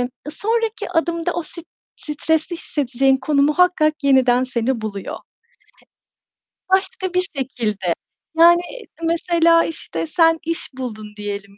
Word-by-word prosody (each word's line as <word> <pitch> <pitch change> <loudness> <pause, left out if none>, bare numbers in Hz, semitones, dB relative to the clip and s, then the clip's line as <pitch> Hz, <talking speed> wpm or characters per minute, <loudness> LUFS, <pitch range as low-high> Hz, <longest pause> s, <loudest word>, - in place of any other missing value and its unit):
ııı, 245 - -1 0.2
sonraki 450 +6 -2
adımda 335 +1 0
o 345 - -2
st 335 +1 -11 0.3
stresli 320 +3 -1
hissedeceğin 270 -3 +1
konu 280 +2 +1
muhakkak 310 +1 +3
yeniden 260 -2 +4
seni 250 -1 -1
buluyor. 200 -3 -6 1.5
Başka 380 -1 +1
bir 365 - +3 0.2
şekilde, 210 -9 -2 0.4
yani, 345 +1 +7 0.4
mesela, 335 0 +3
işte, 165 - -5
sen 325 - +3
iş 330 0 -2
buldun 215 -5 -6
diyelim 200 -1 -6
300 Hz, 115 wpm, -20 LUFS, 245-335 Hz, 1.5 s, yani